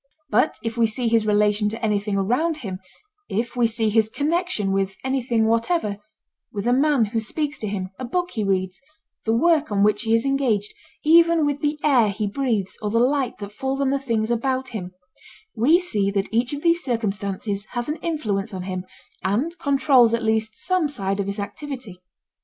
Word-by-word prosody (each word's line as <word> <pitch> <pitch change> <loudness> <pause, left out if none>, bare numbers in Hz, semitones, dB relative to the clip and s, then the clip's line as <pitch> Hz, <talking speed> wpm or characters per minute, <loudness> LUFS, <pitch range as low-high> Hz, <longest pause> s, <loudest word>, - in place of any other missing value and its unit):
But 225 +4 +2
if 225 0 -3
we 230 -1 +4
see 235 +2 -2
his 225 -1 +2
relation 210 0 +2
to 225 +2 -4
anything 205 -1 0
around 255 - +1
him, 185 -2 -4 0.5
if 230 +5 -2
we 240 -2 +3
see 225 -1 0
his 220 0 +3
connection 300 - -1
with 195 0 0
anything 245 -4 +1
whatever—with 215 - -3
a 245 - +3
man 275 -2 +3
who 225 +2 -2
speaks 295 +7 -2
to 215 - -3
him, 190 -2 -3
a 255 - -4
book 355 +8 -1
he 220 - -2
reads, 190 0 -1 0.4
the 225 - +1
work 310 -2 +3
on 200 -1 +2
which 210 0 +3
he 225 -1 +2
is 230 - +1
engaged, 250 -7 0 0.3
even 335 0 +5
with 290 0 -1
the 300 0 -1
air 250 -8 +4
he 210 +2 -2
breathes 210 -3 -2
or 210 - -1
the 225 - 0
light 255 +1 +1
that 205 -1 -7
falls 265 +3 -2
on 275 -1 +1
the 275 - +1
things 230 -4 -1
about 260 +2 -1
him—we 195 - -2
see 210 - 0
that 200 +1 -2
each 235 +2 +1
of 290 0 -5
these 340 0 +3
circumstances 205 -3 -2
has 240 -1 -2
an 300 +2 -2
influence 225 - -2
on 185 - -5
him 185 -1 -4 0.4
and 250 - 0
controls 270 -4 +4
at 230 - -4
least 220 0 0
some 340 0 +1
side 195 -7 -2
of 200 - -1
his 200 +1 -3
activity. 245 -3 -6
230 Hz, 190 wpm, -23 LUFS, 205-275 Hz, 0.5 s, even